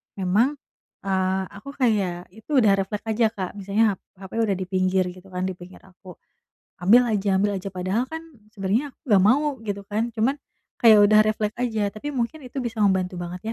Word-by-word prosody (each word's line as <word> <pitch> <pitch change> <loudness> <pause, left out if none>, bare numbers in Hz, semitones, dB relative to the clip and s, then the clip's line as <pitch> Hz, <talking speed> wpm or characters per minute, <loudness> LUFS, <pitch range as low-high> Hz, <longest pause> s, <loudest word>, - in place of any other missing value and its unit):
memang, 205 +9 +1 0.5
eee, 190 0 0
aku 205 +7 -10
kayak 195 -9 0
itu 220 +7 -18
udah 205 - +5
refleks 200 +2 -4
aja 220 +1 +3
Kak. 185 -4 -4
Misalnya 200 +3 +1
hap - - -45 0.2
hape 190 +3 -9
udah 210 -4 +1
dipinggir 185 0 0
gitu 185 +1 -15
kan, 180 0 -2
dipinggir 180 0 -10
aku. 185 -1 -14 0.7
Ambil 230 +6 +7
aja 205 -2 0
ambil 205 0 +1
aja 195 +1 -5
padahal 185 +6 -1
kan, 320 - -4 0.3
sebenarnya 220 +7 -1
aku - - -44
nggak 200 -4 +5
mau, 280 +5 +3
gitu 200 -1 -3
kan, 225 +3 -1
cuman, 235 +5 0 0.4
kayak 220 -3 +7
udah 215 +1 +6
refleks 215 0 -1
aja, 220 -4 -1
tapi 290 +7 -5
mungkin 265 +4 -3
itu 255 +2 -5
bisa 235 -2 -4
membantu 190 -2 +1
banget 175 +1 -6
205 Hz, 180 wpm, -24 LUFS, 190-230 Hz, 0.7 s, Ambil